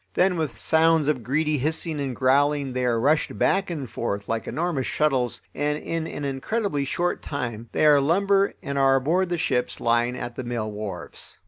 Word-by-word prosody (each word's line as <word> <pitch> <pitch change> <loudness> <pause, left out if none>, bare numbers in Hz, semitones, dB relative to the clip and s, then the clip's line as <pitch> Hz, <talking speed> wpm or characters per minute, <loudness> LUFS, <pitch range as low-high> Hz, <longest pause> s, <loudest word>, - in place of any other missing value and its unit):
Then 180 0 +3
with 155 -9 -3
sounds 160 +1 +3
of 150 -5 +1
greedy 150 +5 0
hissing 155 +2 -1
and 135 -3 -3
growling 140 +1 +2
they 125 0 -1
are 120 -2 +1
rushed 150 +6 +1
back 195 -1 +2
and 150 -6 -4
forth 100 -3 -4
like 115 0 -2
enormous 160 -5 -1
shuttles, 135 -5 0
and 150 0 -1
in 165 +1 -3
an 145 - -5
incredibly 145 - -1
short 175 +5 -1
time 120 -5 -5
they - - +1
are 145 -2 +6
lumber 195 +6 +2
and 140 0 -2
are 135 0 +5
aboard 170 +8 +1
the 175 - -1
ships 125 -5 -1
lying 120 +1 +1
at 120 -1 -6
the 130 - -5
mill 120 -3 -3
wharves. 105 -4 -7
140 Hz, 190 wpm, -24 LUFS, 125-160 Hz, -, are